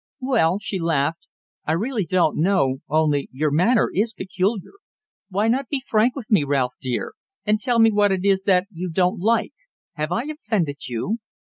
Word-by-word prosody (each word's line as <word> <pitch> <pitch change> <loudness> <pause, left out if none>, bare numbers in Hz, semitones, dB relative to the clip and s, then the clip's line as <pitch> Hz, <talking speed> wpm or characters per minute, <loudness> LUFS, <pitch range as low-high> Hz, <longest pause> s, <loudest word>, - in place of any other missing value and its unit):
"Well," 230 -10 +2
she 200 -2 -4
laughed, 165 -1 -1 0.4
"I 155 - +2
really 210 +1 -1
don't 180 -4 +2
know, 150 -7 +2
only 150 -2 +1
your 150 +3 -1
manner 190 - +3
is 220 +4 0
peculiar. 195 +1 -2 0.6
Why 205 +3 0
not 250 +2 0
be 275 -3 -2
frank 220 +3 +2
with 245 -6 -8
me, 195 -8 +5
Ralph, 135 -3 0
dear, 125 -2 -3 0.3
and 210 0 +1
tell 240 +2 +1
me 225 -1 +6
what 205 -1 +3
it 190 0 -1
is 195 -1 +2
that 185 -1 +3
you 180 0 -5
don't 180 +2 +1
like. 225 +5 +1 0.4
Have 155 0 -3
I 230 +7 0
offended 215 - -3
you?" 160 - -2
190 Hz, 180 wpm, -22 LUFS, 160-220 Hz, 0.6 s, me